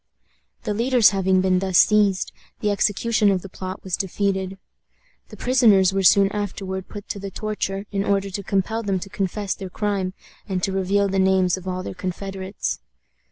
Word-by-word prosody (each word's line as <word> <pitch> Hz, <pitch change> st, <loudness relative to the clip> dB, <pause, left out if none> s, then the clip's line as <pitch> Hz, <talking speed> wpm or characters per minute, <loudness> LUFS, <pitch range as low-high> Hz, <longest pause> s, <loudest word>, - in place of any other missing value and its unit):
The -, -, -1 dB
leaders 235 Hz, 0 st, +4 dB
having 190 Hz, -1 st, +2 dB
been 185 Hz, -1 st, +2 dB
thus 190 Hz, -1 st, +1 dB
seized, 205 Hz, -3 st, +4 dB, 0.3 s
the 210 Hz, -, 0 dB
execution 210 Hz, +1 st, +2 dB
of 190 Hz, -2 st, 0 dB
the 195 Hz, -, -8 dB
plot 185 Hz, 0 st, -7 dB
was 185 Hz, -2 st, -1 dB
defeated. 190 Hz, 0 st, -2 dB, 0.7 s
The -, -, -11 dB
prisoners 215 Hz, -7 st, +4 dB
were 195 Hz, -, +1 dB
soon 195 Hz, +2 st, +5 dB
afterward 195 Hz, -2 st, -4 dB
put 205 Hz, -2 st, -9 dB
to 200 Hz, -, -4 dB
the 195 Hz, 0 st, -5 dB
torture, 200 Hz, -1 st, -3 dB
in 195 Hz, -1 st, 0 dB
order 200 Hz, -1 st, 0 dB
to 200 Hz, -, -4 dB
compel 200 Hz, +3 st, -1 dB
them 200 Hz, -3 st, -1 dB
to 195 Hz, -, -8 dB
confess 195 Hz, 0 st, -2 dB
their 190 Hz, -2 st, -7 dB
crime, 195 Hz, -2 st, -2 dB, 0.3 s
and 185 Hz, -2 st, -2 dB
to 195 Hz, -, +1 dB
reveal 195 Hz, +1 st, +1 dB
the 195 Hz, 0 st, 0 dB
names 190 Hz, -1 st, +3 dB
of 190 Hz, 0 st, -10 dB
all 185 Hz, 0 st, -3 dB
their -, -, -5 dB
confederates. 190 Hz, +1 st, -4 dB
195 Hz, 180 wpm, -23 LUFS, 190-205 Hz, 0.7 s, soon